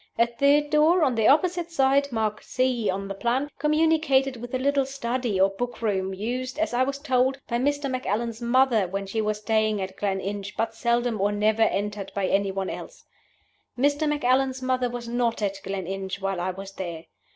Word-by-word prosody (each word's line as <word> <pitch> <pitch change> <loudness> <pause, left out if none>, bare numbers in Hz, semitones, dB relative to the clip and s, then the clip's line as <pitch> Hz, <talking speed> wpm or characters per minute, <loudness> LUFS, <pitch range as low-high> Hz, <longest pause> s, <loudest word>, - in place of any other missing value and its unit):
A 235 - +5
third 280 +5 +2
door, 315 +3 +4
on 265 - +3
the 225 -2 +2
opposite 345 +3 +3
side 280 -2 +2
(marked 215 -2 -1
C 250 -5 0
on 195 +1 -2
the 195 - -4
plan), 245 +8 -1
communicated 300 -3 +2
with 240 +1 -8
a - - +2
little 280 +1 +2
study, 250 -5 -2
or 195 +1 +5
book 245 +4 -4
room, 195 -4 -1
used, 250 +7 -4
as 320 -5 -1
I 245 - +2
was 275 +2 0
told, 265 -2 +1
by 235 0 -1
Mr. 285 +2 0
Macallan's 235 -2 -2
mother 240 -4 +3
when 195 +2 -4
she 220 +3 -2
was 215 0 -1
staying 215 0 +1
at 190 0 -5
Gleninch, 200 0 -3
but 225 0 -1
seldom 235 -2 0
or 205 +1 +2
never 215 +2 +1
entered 205 -2 0
by 200 -1 0
any 195 +1 +1
one 190 0 -3
else. - - -9 0.7
Mr. 290 +4 +2
Macallan's 265 -2 +1
mother 255 -1 +1
was 240 -1 -6
not 235 -1 0
at 195 -1 -2
Gleninch 195 0 -4
while 195 -2 -2
I 185 - -1
was 195 +1 -7
there. 170 -4 -6
235 Hz, 190 wpm, -25 LUFS, 200-270 Hz, 0.7 s, A